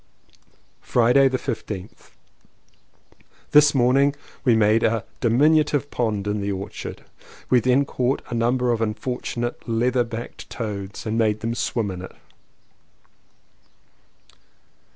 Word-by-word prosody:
Friday 125 +3 +4
the 130 -1 0
15th. 105 -6 -6 1.4
This 150 -1 +6
morning 135 +3 +3 0.3
we 120 -4 +4
made 110 +1 +3
a 115 -1 +1
diminutive 145 +4 +2
pond 110 -4 -1
in 105 0 -1
the 100 0 -2
orchard. 95 0 -6 0.5
We 125 - +6
then 130 +4 +2
caught 130 0 -1
a - - -5
number 120 +1 +1
of 115 -1 -1
unfortunate 120 +2 -3
leather 120 +2 +2
backed 115 0 -8
toads 100 -2 -5
and 110 +1 -1
made 110 -1 +1
them 115 +1 -2
swim 115 -3 -2
in 90 -1 -7
it. 95 - -10
120 Hz, 115 wpm, -23 LUFS, 110-130 Hz, 1.4 s, This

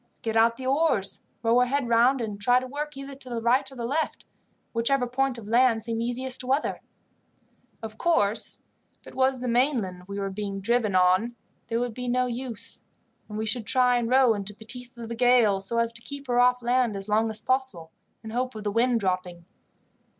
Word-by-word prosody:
"Get 225 -1 -2
out 230 +1 +4
the 260 - -7
oars, 265 -8 +1 0.2
row 230 +2 +4
her 250 - +3
head 275 0 0
round, 240 +3 +3
and 210 -3 -5
try 245 +4 +4
to 255 - -7
work 295 +2 -5
either 275 0 -7
to 265 -1 -12
the 235 -1 -3
right 245 +4 +1
or - - -12
left, 260 +6 -2 0.5
whichever 245 +3 +2
point 255 +1 -1
of 220 -3 -10
land 230 -1 +3
seemed 230 0 -2
easiest 250 +2 -1
to 250 - -7
weather. 270 +3 0 1.0
Of 220 0 -8
course, 220 -11 +1 0.4
if - - -26
it - - -12
was 260 -1 +1
the 250 - -3
mainland 235 -8 0
we 200 0 -6
were 195 -1 -3
being 200 0 -4
driven 215 -1 +1
on 185 +6 +3 0.3
there 230 - -1
would 245 -1 -2
be 250 +2 -6
no 250 +1 +1
use, 245 -2 -5 0.5
and 210 - -6
we 220 - -2
should 220 0 -1
try 250 -1 +4
and 235 -1 -1
row 255 -2 +5
into 205 0 -5
the 220 +2 -14
teeth 245 +1 -3
of 230 -1 -7
the 235 - -5
gale, 235 -4 +4
so 195 +4 -2
as 230 0 +3
to 235 0 -9
keep 280 +3 -8
her 245 -2 +1
off 250 0 +3
land 245 -2 +1
as 195 +1 -4
long 220 +2 +2
as 220 -1 -3
possible, 225 -12 -1 0.3
in 220 - -7
the - - -7
hope 255 -1 -2
of 215 - -7
the 205 - -1
wind 235 +1 +2
dropping. 180 -2 -3
235 Hz, 215 wpm, -26 LUFS, 215-255 Hz, 1.0 s, row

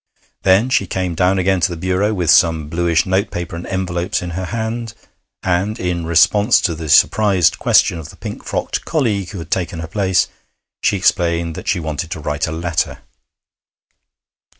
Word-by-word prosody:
Then 100 +7 +3
she 130 - +2
came 90 -2 -2
down 90 +3 +2
again 95 0 +2
to 90 - +2
the 85 - -5
bureau 95 +4 0
with 90 -6 +1
some 80 -2 +3
bluish 85 0 +1
note 95 +1 0
paper 85 -1 -5
and 85 - -7
envelopes 90 -2 -2
in 90 - -5
her 95 +2 -4
hand, 115 +1 -4 0.5
and, 95 +4 0
in 85 -2 -2
response 100 +7 +4
to 85 - 0
the 80 -1 -7
surprised 95 +4 +4
question 85 - +3
of 80 - -9
the - - -13
pink - - -8
frocked - - -3
colleague 105 - -1
who 100 - -8
had 80 -2 -8
taken 85 -2 -1
her 80 0 -5
place, 95 +1 +1 0.5
she 100 - +2
explained 85 -2 +1
that - - -9
she 100 -3 +1
wanted 80 -1 -4
to 80 - -5
write 75 0 -2
a - - -4
letter. 80 0 -2
90 Hz, 180 wpm, -18 LUFS, 85-95 Hz, 0.5 s, response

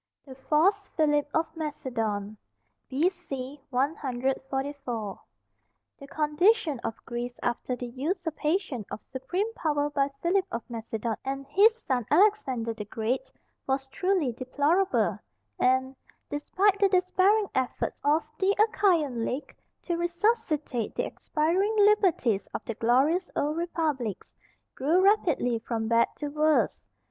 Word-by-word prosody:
THE 270 - -10
FALSE 340 +9 +2
PHILIP 295 -2 +2
OF 320 0 0
MACEDON. 225 -9 -3 0.5
B.C. 275 -3 -2
144. 265 -3 -2 0.8
The 275 - -10
condition 310 - +2
of 225 - -4
Greece 240 0 -5
after 240 +1 -1
the 245 - -6
usurpation 305 - -2
of - - -7
supreme 360 - -3
power 295 -6 0
by 280 -1 +1
Philip 375 +2 +2
of 230 - -5
Macedon 225 0 -3
and 275 +1 -4
his 430 +9 +5
son, 250 -5 -1
Alexander 295 - +3
the 210 -2 -7
Great, 240 +5 -2 0.4
was 270 0 0
truly 360 -2 +1
deplorable, 290 - +1 0.4
and, 260 +1 +2 0.4
despite 390 +7 +1
the 400 -1 +4
despairing 380 +3 +3
efforts 260 -1 -2
of 300 +2 +3 0.2
the 395 +1 +3
Achaian 340 - +2
League 260 +5 -4 0.3
to 345 -2 -1
resuscitate 345 - 0
the - - 0
expiring 360 +8 0
liberties 375 - +3
of - - -5
the 230 - -3
glorious 270 - +2
old 295 +2 0
republics, 310 - -2 0.4
grew 310 +7 +2
rapidly 325 - +3
from 225 -1 -3
bad 230 0 +4
to 295 - -4
worse. 305 +1 +2
290 Hz, 120 wpm, -28 LUFS, 250-360 Hz, 0.8 s, his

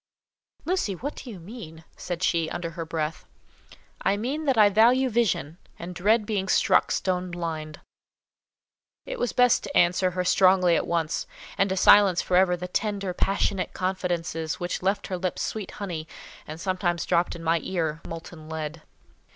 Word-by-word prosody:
"Lucy, 340 - 0
what 280 +10 -5
do 255 - -10
you 205 -6 -8
mean?" 165 -4 -10
said 175 0 -5
she, 165 -3 +1
under 170 -1 -4
her 165 -1 -5
breath. 160 -1 -3 0.8
"I 195 +1 +1
mean 275 +9 -3
that 270 -4 +2
I 210 -1 +7
value 240 +5 +4
vision, 190 -8 0 0.2
and 175 +2 -7
dread 210 +5 +2
being 200 -3 -2
struck - - +3
stone 180 -1 -1
blind." 160 -3 -5 1.3
It - - -6
was 245 - 0
best 250 -1 +4
to - - -2
answer 175 +1 +3
her 180 0 -2
strongly 185 -1 +4
at - - 0
once, 165 -2 -1 0.3
and 195 0 +2
to 190 - -1
silence 195 -1 +6
for 180 - 0
ever 180 -1 +4
the 180 +1 -5
tender, 200 -1 -2
passionate 195 0 0
confidences 175 -4 -2
which 175 0 -3
left 195 +2 0
her 185 -2 -4
lips 185 0 -2
sweet 215 -4 -4
honey, 170 -6 -5 0.4
and 155 +1 -7
sometimes 180 -1 -1
dropped 175 -1 +1
in 165 - -9
my 165 +1 +2
ear—molten 165 -1 -5
lead. 160 0 -5
180 Hz, 165 wpm, -26 LUFS, 165-200 Hz, 1.3 s, I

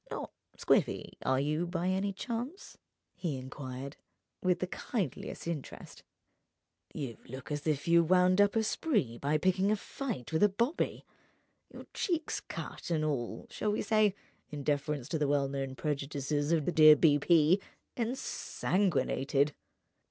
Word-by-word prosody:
"Not - - -5 0.3
squiffy, - - +1
are 130 0 +2
you, 155 +5 0
by 175 +1 -1
any 190 +2 0
chance?" 240 - -5 0.4
he 170 -6 -3
enquired 130 +1 -7 0.4
with 180 -1 +2
the 185 - -1
kindliest 185 - -4
interest. 165 -5 -6 0.9
"You 135 -8 -5
look 130 +4 -8
as 145 +1 -3
if 150 -1 0
you'd 170 -1 +4
wound 185 +1 +5
up 205 +1 +3
a 225 - +3
spree 210 - 0
by 145 +2 +1
picking 185 +4 +2
a - - +4
fight 210 - -5
with 160 - +1
a 210 - +6
bobby. 235 - -1 0.7
Your - - -10
cheek's 335 -4 -1
cut - - -7
and 155 -2 +1
all 130 -6 -2
(shall 210 - -1
we 210 - -1
say, 215 -3 +3 0.3
in 145 -2 -6
deference 145 -2 -1
to 160 - -1
the 150 - +1
well 140 -1 +2
known 135 -1 -4
prejudices 145 +1 -2
of 160 -4 +2
the - - +1
dear 155 -2 +9
B.P.?) 160 +4 +4 0.3
ensanguined. 175 - 0
160 Hz, 145 wpm, -31 LUFS, 140-195 Hz, 0.9 s, dear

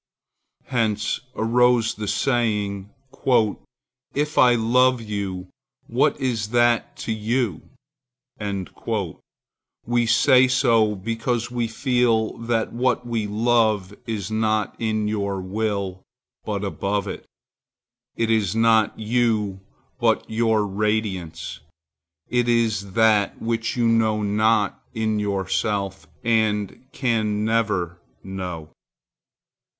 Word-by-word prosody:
Hence 110 -3 0 0.2
arose 120 0 +3
the 105 0 -6
saying, 105 -6 0 1.3
"If 150 +1 -1
I 125 -1 +6
love 125 +2 +3
you, 100 -4 -4 0.4
what 120 +4 +1
is 120 -6 -1
that 120 0 +2
to - - -2
you?" 110 -3 -1 2.2
We 120 0 +1
say 130 +2 +5
so 115 -4 +3
because 115 +4 -2
we 120 -1 -1
feel 115 -2 +1
that 115 -1 -1
what 125 0 0
we 115 -3 -2
love 110 -2 +1
is 110 -3 -3
not 110 -1 0
in 110 -1 0
your 100 -2 -2
will, 100 -1 -2 0.4
but 105 -2 -2
above 100 0 -2
it. - - -7 0.9
It 115 -1 0
is 110 -3 +1
not 115 -1 +3
you, 110 -3 0 0.4
but - - +2
your 110 -1 +1
radiance. 100 -5 -2 0.7
It 120 -1 +1
is 110 -5 +1
that 110 -2 +3
which 115 +1 -2
you 120 -1 +2
know 110 -2 +2
not 105 0 +1
in 110 -1 0
yourself 100 0 -2 0.2
and 110 0 0
can 110 -5 0
never 100 -7 0 0.2
know. 90 -5 -6
110 Hz, 105 wpm, -23 LUFS, 100-115 Hz, 2.2 s, I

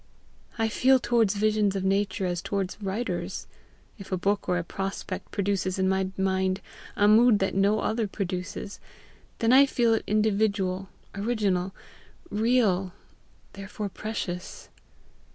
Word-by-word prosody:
I 225 -1 +1
feel 260 +4 +4
towards 230 -4 +2
visions 210 -1 +2
of 195 - -2
nature 195 0 0
as 175 -1 -2
towards 200 +2 -3
writers. 205 +5 -3 0.5
If 195 - -10
a 185 - +1
book 200 +1 -1
or 180 - +2
a 175 - -1
prospect 195 +3 -5
produces 195 -2 -1
in 190 0 +1
my 190 0 +1
mind 190 0 +1 0.4
a 205 - +4
mood 225 +1 +6
that 195 -1 -1
no 200 +2 +2
other 220 -1 0
produces, 195 +1 -5 0.6
then 230 +2 +3
I 275 +2 +7
feel 235 -3 +2
it 225 - 0
individual, 200 -3 +1 0.2
original, 200 -4 0 0.6
real, 210 -5 +2 0.6
therefore 200 +1 -6
precious. 190 -4 -5
200 Hz, 135 wpm, -27 LUFS, 190-215 Hz, 0.6 s, I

